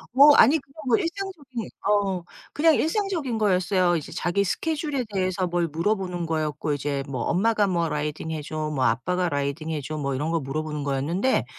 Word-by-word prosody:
어 290 +2 +9
아니 280 +8 +7
그건 275 +1 -23
뭐 235 - +4
일상적인 330 - -4 0.2
어 200 -3 +1 0.3
그냥 320 +1 +4
일상적인 325 - -1
거였어요. 185 -3 +2
이제 150 - -7
자기 175 +4 0
스케줄에 295 - -1
대해서 185 -1 0
뭘 175 -1 0
물어보는 180 +2 -1
거였고 155 -2 -1
이제 140 -1 -2
뭐 130 -3 -3
'엄마가 210 +3 +2
뭐 170 -3 0
라이딩해 150 +1 -3
줘, 155 0 -3
뭐 130 -3 +1
아빠가 180 +10 +1
라이딩해 145 +2 -2
줘.' 155 +3 -5
뭐 140 -2 -2
이런 150 +5 -2
거 165 - +1
물어보는 150 +1 -4
거였는데 150 - 0
175 Hz, 380 characters per minute, -25 LUFS, 150-225 Hz, 0.3 s, 어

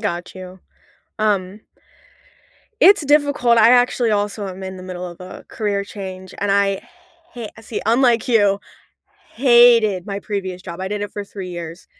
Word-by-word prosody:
got 175 +2 -4
you. 185 0 -11 0.6
Um 205 -1 -1 1.2
It's 400 -7 +6
difficult, 285 -5 +3
I 225 +2 +6
actually 245 -2 +3
also 205 -1 -2
am 190 +1 -9
in 190 0 -7
the - - -10
middle 180 -1 -6
of 175 0 -11
a 180 +1 -10
career 205 -2 -2
change, 190 -2 -9
and 205 0 -1
I 200 -1 +1 0.5
ha 235 -3 -6
see, 225 0 -6
unlike 235 0 +2
you, 205 -5 +3 0.8
hated 235 -6 +5
my 200 -1 -4
previous 190 -3 -5
job. 170 0 -8
I 190 - -3
did 205 0 -3
it 205 - -6
for 205 - -5
3 195 -2 -8
years. 170 -1 -8
200 Hz, 160 wpm, -19 LUFS, 185-230 Hz, 1.2 s, It's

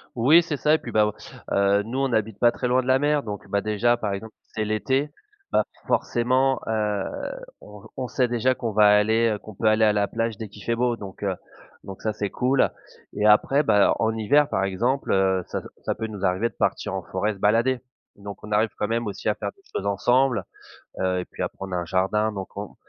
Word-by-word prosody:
Oui 140 +9 +6
c'est 165 -3 -3
ça 150 +1 +3
et - - +3
puis 120 - -8
bah, 105 0 +3 0.4
heu, 100 +1 +3
nous 125 +4 -4
on 135 0 +1
n'habite 110 -2 -1
pas 120 -1 +4
très 125 - -2
loin 130 +1 +3
de 125 - -9
la 130 0 +4
mer 145 0 +1
donc 105 -2 -7
bah, 100 0 0
déjà, 110 +3 +2
par 105 -3 -3
exemple, 110 +3 -6
si - - -41
c'est 110 - -1
l'été, 130 +7 0 0.4
bah, - - +3 0.2
forcément, 130 +3 +1
heu, 105 -3 -1 0.5
on 105 -1 -13
on 125 -2 -3
sait 125 +1 +1
déjà 120 +2 +1
qu'on 115 -3 -4
va 105 0 +6
aller, 110 +2 +3
heu, - - -5
qu'on 110 +1 -12
peut 110 - -2
aller 110 +1 +4
à 105 - +4
la 100 -1 +1
plage 115 -2 -2
dès 110 -2 -7
qu'il 100 -1 -13
fait 115 - 0
beau 120 0 +1
donc, 100 -1 -10
heu, 95 -2 0 0.5
donc 95 -1 -9
ça 110 - 0
c'est 105 -1 -3
cool 130 +5 +1 0.4
et 105 +1 -1
après 135 +7 +4
bah, 105 -6 +4
en 110 0 +1
hiver, 140 +7 +3
par 95 - 0
exemple, 120 +9 0
heu, 95 -1 +2
ça - - -4 0.2
ça - - -1
peut 110 - -4
nous 100 -2 -6
arriver 95 +6 0
de - - -31
partir - - -1
en - - -3
forêt 105 +1 -1
se 100 - -12
balader. 115 +6 +2 0.4
Donc 100 0 -10
on 105 - -8
arrive 110 +2 +3
quand 105 - -2
même 115 0 -1
aussi 105 +1 -2
à 105 - 0
faire 100 - -4
des 195 - -26
choses 100 - -3
ensemble, 125 +5 +2 0.6
heu 95 -1 0
et 90 - -4
puis - - -10
après - - -3
on 95 -1 -5
a 90 - -1
un 85 - -3
jardin, 100 +5 0
donc 95 -1 -6
on 100 0 -6
110 Hz, 240 wpm, -24 LUFS, 100-120 Hz, 0.6 s, Oui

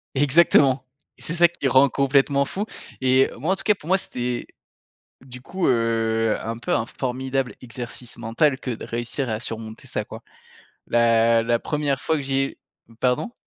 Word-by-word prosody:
Exactement 140 -2 +4 0.4
et - - -19
c'est 165 - 0
ça 175 0 +6
qui 170 -5 -3
rend 130 +2 +6
complètement 140 +1 +2
fou 195 +9 -4 0.3
et 130 0 +4
moi, 160 +10 0
en - - 0
tout - - -4
cas 210 - +4
pour 160 - -14
moi, 190 +2 +4
c'était 125 -8 -4 0.7
du 125 -1 -11
coup, 180 +7 -3
heu, 115 -2 +1
un 115 +1 -4
peu 120 - -2
un 115 - 0
formidable 130 +1 -3
exercice 120 0 -8
mental 120 +4 +1
que - - -6
de 115 - -6
réussir 120 +3 -3
à 110 -1 -2
surmonter 110 -1 -6
ça - - -3
quoi. - - -10 0.7
La 115 -1 +4
la 120 0 +2
1re 145 -3 -1
fois 160 - 0
que - - -3
j'ai 135 0 -1 0.4
pardon? 125 - 0
130 Hz, 175 wpm, -23 LUFS, 115-140 Hz, 0.7 s, ça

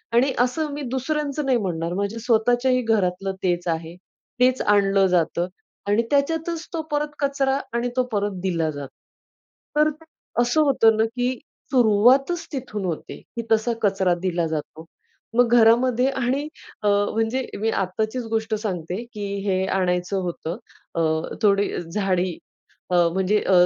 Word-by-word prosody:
आणि 260 +3 +4
असं 290 +5 +1
मी 290 - -5
दुसऱ्यांच 290 +2 -2
नाही 270 -4 +2
म्हणणार 170 -4 -2
माझ्या 200 +4 -2
स्वतःच्याही 245 +2 +2
घरातलं 195 -4 0
तेच 175 -1 0
आहे, 165 0 -2 0.4
तेच 255 +1 +3
आणलं 195 -1 +3
जातं 175 -1 +1 0.4
आणि 205 +3 +3
त्याच्यातच 325 +4 0
तो 330 - -1
परत 295 0 -1
कचरा 275 -1 +1
आणि 235 +1 0
तो 255 - +4
परत 205 -1 0
दिला 170 -4 0
जातो. 145 -2 -7 0.9
तर 300 0 +5
अ, 310 -5 -5
असं 245 +6 +2
होत 275 -6 +2
ना, 220 - +3
की 245 +2 -1 0.4
सुरुवातच 255 +7 +4
तिथून 245 -7 -4
होते 170 -4 -5 0.2
की 235 - -2
तसा 225 +2 +3
कचरा 195 -3 +2
दिला 175 -2 0
जातो. 160 +1 -5 0.5
मग 245 -1 +5
घरामध्ये 240 +2 +4
आणि 265 +2 -1 0.4
अ, - - +2
म्हणजे 225 +5 +1
मी 220 +2 +1
आत्ताचीच 220 +5 -1
गोष्ट 220 0 -1
सांगते 180 -5 -3 0.2
की 205 -1 -4 0.2
हे 190 -1 +1
आणायचं 180 +1 0
होतं. 175 -1 -4 0.4
अ, 165 - +1 0.4
थोडी 205 -1 +3 0.2
झाडी 185 -3 0 0.5
अ, - - +1 0.2
म्हणजे 190 +3 +2
अ, - - +3
220 Hz, 145 wpm, -23 LUFS, 190-255 Hz, 0.9 s, तर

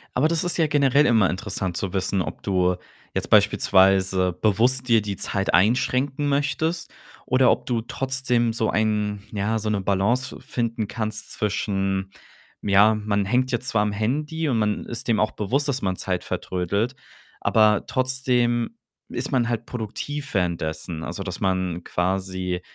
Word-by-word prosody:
Aber 130 +5 +3
das 165 0 0
ist 175 - 0
ja 160 -3 +3
generell 145 0 +3
immer 110 -7 +4
interessant 95 -2 -3
zu 100 -1 -3
wissen, 95 0 0
ob - - -6
du 90 -2 +2 0.4
jetzt - - -2
beispielsweise 95 -1 +4
bewusst 120 +7 +2
dir 115 -3 +4
die 100 -1 -4
Zeit 100 +1 -1
einschränken 130 +8 +2
möchtest 145 +4 -1 0.3
oder 130 0 +4
ob - - -1
du 120 -2 0
trotzdem 125 -1 0
so 110 -1 0
ein 105 -2 0
ja, 110 +2 -1
so 105 0 -2
'ne 105 -2 0
Balance 100 +7 0
fi - - -18
finden 115 -6 -2
kannst 110 -1 -4
zwischen, 95 -2 -1 0.5
hm, 100 - -4
ja, 105 +3 +6
„Man 105 -1 -1
hängt 125 +5 +1
jetzt 120 0 -2
zwar 110 - +2
am 105 0 0
Handy 150 +9 -1
und 120 - +1
man 105 -1 0
ist, 120 +1 -5
äh, 120 - +2
dem 110 - +1
auch 105 - +2
bewusst, 135 +8 -1
dass 135 -1 -1
man 95 -1 0
Zeit 90 -1 -2
vertrödelt, 100 +8 -2 0.5
aber 105 -2 +4
trotzdem 125 -3 0 0.3
ist 125 +4 -3
man 125 -4 +2
halt 120 -1 -2
produktiv 140 +5 -5
währenddessen.“ 85 -3 -2
Also, 85 +4 -5
dass 90 -2 -5
man 95 -2 -1
quasi, 95 0 -2
110 Hz, 165 wpm, -24 LUFS, 95-125 Hz, 0.5 s, ja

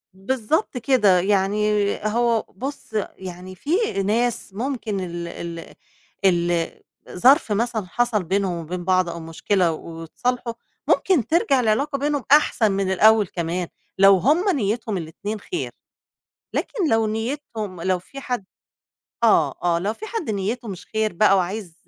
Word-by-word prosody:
بالضبط 255 - -1
كده، 220 -8 +4
يعني 200 +2 +1 0.4
هو 230 +1 +2
بُصّ 270 +3 -8 0.2
يعني 185 0 -8
في 285 - -11 0.4
ناس 230 0 0
ممكن 225 -3 -3
ال 175 -2 -5
ال 170 -1 -7 0.5
ال 175 -2 +2 0.4
ظرف 245 +4 +4
مثلًا 220 0 0
حصَل 235 -1 +1
بينهم 190 +1 0
وبين 175 +2 -5
بعض 185 -1 +2
أو 170 0 -5
مشكلة 170 +2 0
واتصالحوا 170 +10 -4 0.3
ممكن 335 - +2
ترجَع 310 -5 +3
العلاقة 260 +5 +1
بينهم 290 -1 -1
أحسن 250 -7 +4
من 195 -1 0
الأول 215 +2 +5
كمان 170 +1 -3 0.3
لو 195 0 +7
هُم 315 - +2
نيّتهم 215 -3 -1
الاتنين 190 +6 -5
خير، 355 - -4 0.8
لكن 385 -9 -1
لو 225 0 +3
نيّتهم 220 - -4
لو 185 0 +1
في 275 +10 -11
حد 245 -6 -3 0.8
آه، 160 - +4
آه، 170 -1 +2
لو 200 +5 -1
فيه 435 - -8
حد 440 - -4
نيّته 215 +4 -2
مش 190 -3 -7
خير 220 -2 -1
بقى 195 +2 +4
وعايز 185 0 -3
210 Hz, 135 wpm, -23 LUFS, 180-240 Hz, 0.8 s, لو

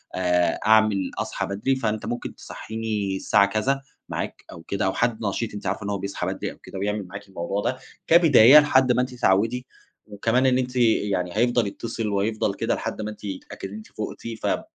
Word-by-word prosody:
آآ، 90 -1 +1
أعمل 110 -3 +4
اصحى - - -2
بدري 105 +7 -1
فأنت 110 -4 -2
ممكن 120 +2 -4
تصحيني 110 -3 -4
الساعة 100 +1 +3
كذا 110 +7 0 0.3
معاك - - -5
أو 85 - -10
كده، 100 +3 -2
أو 95 - +1
حد 115 -1 0
نشيط 105 +2 -2
أنتِ 105 - -7
عارفة - - -2
إن 100 - -4
هو 100 - -1
بيصحى 100 +1 -4
بدري - - -3
أو - - -15
كده 95 - -9
ويعمل 105 -1 -2
معاكِ 100 +2 -9
الموضوع 95 +2 -3
ده 130 +5 -1 0.3
كبداية 150 -5 +8
لحد 135 -4 +4
ما 125 - +3
أنتِ 125 0 -3
تتعودي، 120 +2 +1 0.4
وكمان 115 +5 0
إن 130 -1 +4
أنتِ 125 0 -2
يعني 105 -6 +1
هيفضل 120 -1 +2
يتصِّل 115 +2 -4
وهيفضل 105 +1 0
كده - - -1
لحد - - -4
ما 105 - -3
أنتِ 105 - -14
يتأكد 95 0 -7
إن 100 - -9
أنتِ 110 0 -9
فقتِ 110 +1 -7 0.3
ف - - -11
110 Hz, 195 wpm, -24 LUFS, 100-120 Hz, 0.4 s, كبداية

